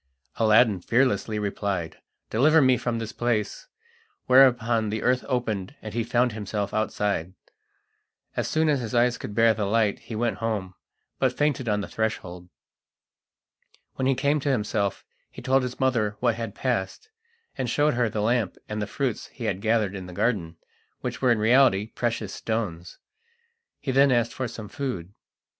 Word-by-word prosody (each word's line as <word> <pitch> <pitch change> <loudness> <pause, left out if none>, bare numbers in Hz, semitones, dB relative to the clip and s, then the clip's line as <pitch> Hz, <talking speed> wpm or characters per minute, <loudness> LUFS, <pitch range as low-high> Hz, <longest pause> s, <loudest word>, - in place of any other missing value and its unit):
Aladdin 110 -2 +4
fearlessly 115 -2 +1
replied: 100 -4 -3 0.3
"Deliver 155 +8 +5
me 130 -3 +5
from 120 -1 -2
this 115 -1 -4
place!" 120 - -2 0.6
whereupon 120 -4 +4
the 110 +1 -3
earth 125 0 +2
opened, 120 -2 -2
and 110 -1 -8
he 115 0 0
found 120 +1 +1
himself 105 -1 -4
outside. 100 -4 -1 1.0
As - - -1
soon 160 0 +1
as 145 -3 +2
his 120 0 -4
eyes 120 +1 +3
could 105 - -7
bear 115 0 +5
the 105 -1 -2
light 110 -1 +1
he 115 - -8
went 115 -2 -1
home, 105 -5 -2 0.5
but 130 -2 +1
fainted 145 -5 0
on 105 0 +1
the - - -5
threshold. 90 -5 -4 1.4
When 130 - -1
he 135 - +3
came 145 +3 +1
to 145 - -2
himself 105 -5 -1 0.2
he - - -11
told 135 +1 +3
his 125 -1 -5
mother 115 -6 +1
what 120 -2 +2
had 115 -2 -5
passed, 125 - -2 0.5
and 130 -3 -2
showed 150 +5 +2
her 120 -2 +1
the 105 0 -2
lamp 115 -3 0
and 105 0 -4
the 105 - -2
fruits 130 0 -2
he 125 - -10
had 100 -4 -2
gathered 110 -3 +1
in 95 -2 -7
the 90 - -9
garden, 85 -6 -1 0.4
which - - -4
were 130 -2 +4
in 115 - +3
reality 110 -2 +4
precious 115 -2 -3
stones. 95 -6 -4 0.8
He 135 - -3
then 135 +1 +5
asked 120 -1 +1
for 130 - -3
some 110 -2 -8
food. 105 -9 -5
115 Hz, 170 wpm, -25 LUFS, 105-125 Hz, 1.4 s, Deliver